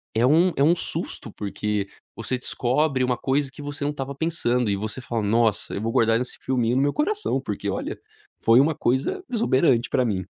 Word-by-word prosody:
é 115 +2 +3
um 165 +7 +4
é 140 - +4
um 165 +4 +5
susto, - - -4
porque 105 0 -2 0.3
você 130 - -2
descobre 130 +2 0
uma 125 -1 0
coisa 135 +1 0
que 140 - -11
você 145 0 -5
não 145 - 0
estava 140 -1 -5
pensando 125 -6 0
e 100 - +1
você 110 +5 -4
fala, 115 -3 -3
nossa, 110 0 +1
eu 100 - -3
vou 115 +1 -1
guardar 115 0 +3
esse 125 - -4
filminho 125 -2 0
no 130 - +3
meu 145 - +1
coração, 415 +7 0
porque, - - -4
olha, - - -3 0.5
foi 115 +2 +6
uma 150 +3 +3
coisa 135 - 0
exuberante 130 - +2
pra 130 - +2
mim. 95 -5 -1
130 Hz, 200 wpm, -24 LUFS, 115-145 Hz, 0.5 s, foi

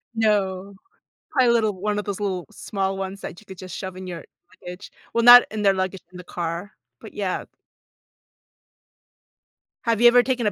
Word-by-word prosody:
No. 200 -3 0 0.5
Probably 250 -2 +3
a - - +4
little 220 -3 +2
one 205 +3 -3
of 210 - -2
those 200 0 -4
little 185 -5 -3
small 195 -1 -3
ones 195 0 -5
that 175 - -8
you 215 - -20
could 190 -2 -11
just 185 0 -9
shove 185 -1 -6
in 185 0 -8
your 170 -3 -7 0.4
luggage. 180 +3 -9 0.2
Well, 235 0 +1
not 245 0 +10
in 215 -1 -4
their 195 -1 +4
luggage, 185 -1 -3
in 180 - -11
the 180 - -9
car, 175 +4 -5 0.3
but, 220 - -12
yeah. 195 -3 -3 2.4
Have 230 -2 +1
you 240 - +7
ever 245 0 +6
taken 250 -3 -1
a 210 - +2
195 Hz, 190 wpm, -23 LUFS, 185-215 Hz, 2.4 s, not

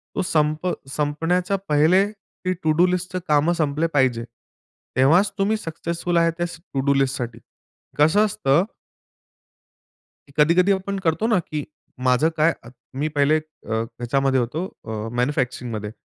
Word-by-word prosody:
तो 195 - 0
संप 155 -1 0 0.2
संपण्याच्या 165 +7 0
पहिले 160 +7 +4
ती 185 -2 -6
टू-डू 160 +3 +4
लिस्टचं 180 0 -2
कामं 150 +3 +3
संपले 155 0 0
पाहिजे. 130 -4 +2 0.7
तेव्हाच 160 - +4
तुम्ही 205 +3 +1
सक्सेसफुल 170 -1 -3
आहे 170 0 +4
त्या 175 - 0 0.3
टू-डू 140 +1 +2
लिस्टसाठी. 125 -4 -1 0.6
कसं 160 +8 +5
असतं 155 -5 +2 1.6
की 140 - -20
कधी-कधी 175 +6 +5
आपण 195 +1 -1
करतो 165 +8 +1
ना 215 -6 +3
की 150 -3 -5 0.4
माझं 125 +5 +4
काय 165 +2 +4
अ, 120 - -11 0.3
मी 145 +3 -1
पहिले 145 +2 +4
अ, 155 - -5 0.5
त्याच्यामध्ये 135 +2 +1
होतो 145 +10 -2 0.2
अ, 110 - -6 0.2
मॅन्युफॅक्चरिंगमध्ये. 125 -4 -2
155 Hz, 130 wpm, -22 LUFS, 135-180 Hz, 1.6 s, कसं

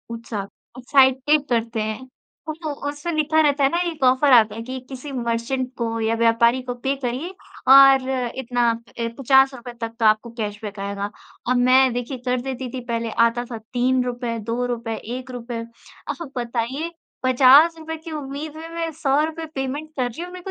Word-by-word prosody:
उत्साह 220 -3 -5 0.3
एक्साइटेड 265 +3 +3
करते 230 -2 0
हैं। 260 +4 -11 0.4
उस 310 - -4 0.3
उसमें 290 +4 -4
लिखा 310 0 +2
रहता 290 -2 +2
है 270 - +5
ना, 340 - -1
एक 305 -4 -7
ऑफ़र 260 +2 +4
आता 220 -3 +5
है 225 - -5
कि 260 +1 -6
किसी 270 +2 -7
मर्चेंट 245 +1 -2
को 230 -1 -2
या 225 0 +1
व्यापारी 230 +2 +3
को 250 -1 -4
पे 275 +1 +1
करिए 260 +10 -3 0.4
और 270 -1 +7
इतना 245 -2 0
अ, 230 0 -5
₹50 265 -2 +3
तक 230 0 -4
का 225 - +4
आपको 215 +2 0
कैशबैक 210 -1 -5
आएगा। 200 0 -3 0.4
अब 255 - +3
मैं, 255 +1 +5
देखिए, 245 +2 -4
कर 250 0 0
देती 260 -1 -5
थी 255 - -4
पहले, 230 -1 -2
आता 235 +1 +2
था 230 - -4 0.2
₹3, 245 -1 0
₹2, 230 0 -3
₹1। 245 0 -6 0.5
अब 335 -5 -5
बताइए 245 +7 -2 0.3
₹50 305 +6 +5
की 320 +1 -10
उम्मीद 285 +3 -6
में 325 +1 -8
मैं 330 -1 -3
₹100 310 +3 +1
पेमेंट 275 +3 -3
कर 250 -2 0
रही 275 - -8
हूँ 350 - -4
और - - -11
मेरे 365 -1 -9
255 Hz, 170 wpm, -22 LUFS, 235-275 Hz, 0.5 s, और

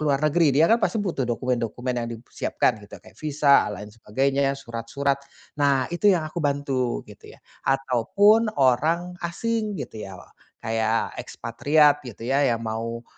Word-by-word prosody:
luar 145 -2 +2
negeri, 155 +2 +2
dia 145 +4 +4
kan 230 +5 +4
pasti - - 0
butuh 175 - -2
dokumen-dokumen 125 0 -2
yang 120 -1 -3
dipersiapkan 115 -1 -2
gitu, 105 - -12
kayak - - -17
visa, 145 -4 +3
hal 105 - -5
lain 105 0 -9
sebagainya, 135 +5 0
surat-surat, 135 +3 -3 0.4
nah 140 -2 +3
itu 175 +4 +2
yang 180 -5 +3
aku 155 +2 -5
bantu, 140 -4 -1
gitu - - -14
ya. - - -25 0.3
Ataupun 160 - +3
orang 155 +7 +2
asing 215 +4 -2
gitu 120 -7 -7
ya, 95 - -9 0.5
kayak 110 0 -1
ekspatriat 145 +5 +2
gitu 120 -4 -10
ya, 135 +2 +2
yang 115 -1 -1
mau 115 +1 -4
135 Hz, 155 wpm, -24 LUFS, 115-155 Hz, 0.5 s, dia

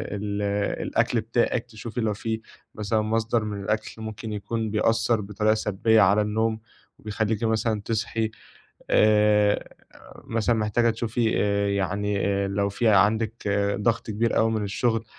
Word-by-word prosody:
ال 100 0 -3 0.5
الأكل - - +1
بتاعِك، - - 0
تشوفي 115 +2 -6
لو 110 -2 0
في 110 +1 -4 0.3
مثلًا 110 0 0
مصدر 115 +1 0
من 105 -2 -5
الأكل 110 +2 -2
ممكن 110 0 -6
يكون 110 +2 -3
بيأثّر 115 +1 +1
بطريقة 105 +2 +1
سلبية 110 +2 +2
على 100 +2 +4
النوم 110 +1 0 0.4
وبيخليكِ 110 +1 -2
مثلًا 110 -1 0
تصحي. 110 0 -1 0.6
آآ، 105 -1 +3 0.6
مثلًا 115 +1 0
محتاجة 110 +2 +1
تشوفي 115 0 -1
آآ، 100 0 +1
يعني 100 +1 -1
آآ، 100 0 0
لو 100 +1 0
في 115 +3 0
عندِك 110 +2 +2 0.3
ضغط 115 +1 0
كبير 115 +3 0
أوي 110 0 +3
من 110 -1 -1
الشغل، 115 +3 -1
110 Hz, 140 wpm, -25 LUFS, 105-115 Hz, 0.6 s, على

